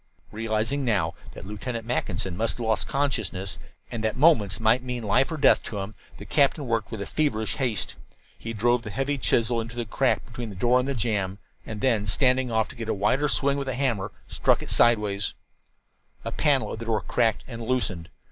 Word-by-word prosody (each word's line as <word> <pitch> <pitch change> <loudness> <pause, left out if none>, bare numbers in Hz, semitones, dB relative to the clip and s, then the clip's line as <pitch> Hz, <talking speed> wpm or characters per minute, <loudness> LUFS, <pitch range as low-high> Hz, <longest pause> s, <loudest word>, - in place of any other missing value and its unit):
Realizing 115 +5 0
now 100 -10 +1 0.2
that - - -10
Lieutenant 115 +3 -5
Mackinson 95 -6 -2
must 110 +4 0
have 120 - -4
lost 110 -1 +1
consciousness, 110 -9 -2 0.3
and 110 -2 -4
that 110 +2 0
moments 120 - +4
might 115 +3 +3
mean 125 -2 -4
life 130 +8 +2
or 160 - -3
death 140 - +5
to 105 - -5
him, 100 +2 -4 0.2
the - - -9
captain 145 0 +2
worked 115 -4 -1
with 100 -3 -5
feverish 110 -8 0
haste. 115 - -1 0.4
He 115 - -6
drove 120 +2 +2
the 110 - -7
heavy 135 +5 -1
chisel 115 -1 +2
into 115 +1 -8
the 120 -1 -2
crack 105 - +1
between 120 -2 -7
the 100 - -8
door 120 +7 +3
and 125 - -1
the 140 - -1
jam, 105 -5 0 0.3
and 110 -2 -6
then, 115 -6 +2
standing 130 +3 +2
off 110 -1 +2
to - - -10
get 115 -2 -6
a - - +1
wider 125 +9 +1
swing 140 +1 +2
with 135 - -4
the 130 - -2
hammer, 120 -8 -1 0.2
struck - - +1
it - - -5
sidewise. 105 -4 +3 0.9
A - - -2
panel 145 -4 +1
of - - -6
the 115 - -6
door 110 -2 0
cracked 115 -3 +1
and 115 -2 -7
loosened. 115 -8 -1
115 Hz, 205 wpm, -26 LUFS, 105-130 Hz, 0.9 s, death